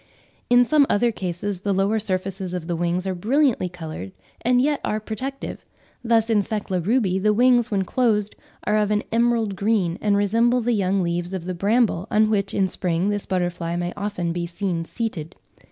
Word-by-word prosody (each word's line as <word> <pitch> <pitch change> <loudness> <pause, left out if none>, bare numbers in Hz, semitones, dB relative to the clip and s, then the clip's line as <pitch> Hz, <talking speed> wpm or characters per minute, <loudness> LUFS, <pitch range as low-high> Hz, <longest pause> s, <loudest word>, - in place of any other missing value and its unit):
In 245 0 +6
some 290 +1 +4
other 235 +3 +2
cases 185 -1 -4
the 200 +1 -1
lower 200 +3 +2
surfaces 190 -2 -3
of 175 -3 -4
the 170 0 -2
wings 175 +2 -1
are 190 - -1
brilliantly 230 +1 +1
coloured, 155 - -7 0.3
and 245 +1 +3
yet 285 +2 +1
are 215 - -1
protective; 260 +6 -6 0.4
thus 225 -1 +3
in 220 -3 +3
Thecla 200 -3 -2
rubi 195 0 +1
the 210 +2 +2
wings 245 0 +4
when 195 -2 0
closed 210 -1 0 0.3
are 210 - +1
of 210 -1 +1
an 210 0 +1
emerald 230 -3 +1
green, 195 -3 0
and 205 -1 +2
resemble 230 +5 +2
the 240 0 0
young 195 -2 +1
leaves 175 +1 -2
of 175 -3 -5
the 185 - -3
bramble, 205 0 +1
on 215 0 +3
which 200 -2 0
in 195 -1 +1
spring 180 +1 -1
this 205 -1 -3
butterfly 175 -2 -1
may 175 0 -2
often 200 -5 -3
be 170 0 -3
seen 175 -2 -3
seated. 190 -7 -5
200 Hz, 185 wpm, -23 LUFS, 180-225 Hz, 0.4 s, In